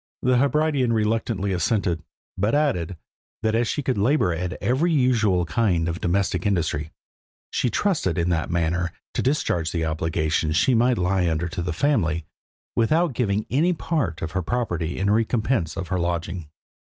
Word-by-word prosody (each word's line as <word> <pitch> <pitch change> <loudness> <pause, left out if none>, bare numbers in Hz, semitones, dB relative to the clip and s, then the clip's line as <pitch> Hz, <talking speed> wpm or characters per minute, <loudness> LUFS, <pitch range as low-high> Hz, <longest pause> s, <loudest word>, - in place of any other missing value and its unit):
The 125 -1 +3
Hebridean 140 -3 +2
reluctantly 110 -2 0
assented, 90 -3 0 0.3
but 105 +7 +1
added, 95 - 0 0.5
that 110 0 +1
as 115 +1 +2
she 145 - -2
could 130 -5 0
labour 105 - +2
at 90 +2 -3
every 130 - +1
usual 110 - +2
kind 90 -5 +1
of 85 +1 -3
domestic 90 0 0
industry, 80 -6 -1 0.6
she 125 - +1
trusted 150 - 0
in 85 0 +1
that 85 -2 0
manner 85 0 0 0.2
to - - 0
discharge 90 - 0
the 85 -2 -1
obligation 80 0 0
she 100 +11 +3
might 120 +1 +3
lie 90 -1 +1
under 80 +2 -1
to 90 +1 -4
the 90 +1 -2
family, 85 - +1 0.5
without 155 +7 +2
giving 105 -3 0
any 160 +8 +3
part 150 - -2
of 80 - -3
her 95 - -1
property 90 -6 -2
in 95 - 0
recompense 110 -5 0
of 95 - -4
her 95 -1 0
lodging. 85 -1 -3
95 Hz, 165 wpm, -24 LUFS, 85-125 Hz, 0.6 s, The